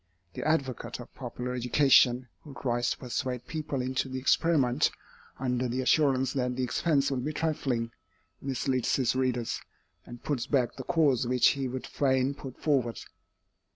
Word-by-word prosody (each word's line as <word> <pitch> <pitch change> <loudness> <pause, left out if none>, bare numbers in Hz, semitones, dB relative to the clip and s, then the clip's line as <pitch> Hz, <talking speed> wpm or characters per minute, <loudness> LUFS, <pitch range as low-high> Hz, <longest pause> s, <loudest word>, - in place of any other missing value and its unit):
The - - -5
advocate 130 -7 -1
of 120 - -11
popular 125 0 -5
education, 125 0 +4
who 145 -3 -12
tries 120 -1 0
to - - -2
persuade 125 0 -3
people 150 -4 -3
into 130 +1 -1
the 130 - -4
experiment, 140 -1 +3 0.5
under 125 -1 -1
the 125 +2 -1
assurance 135 -1 +3
that 125 -2 -1
the 130 - -1
expense 140 +2 +1
will 135 - 0
be 150 +5 -3
trifling, 135 -8 -1 0.5
misleads 130 -2 0
his 130 -2 +1
readers, 125 -3 -1 0.4
and 120 0 -11
puts 140 -4 -2
back 130 -5 +1
the 130 - -7
cause 145 -8 +2
which 125 0 +5
he 135 -2 -1
would 130 +1 -5
fain 130 -1 +1
put 135 -2 -10
forward. 130 -6 +1
130 Hz, 155 wpm, -29 LUFS, 125-140 Hz, 0.5 s, which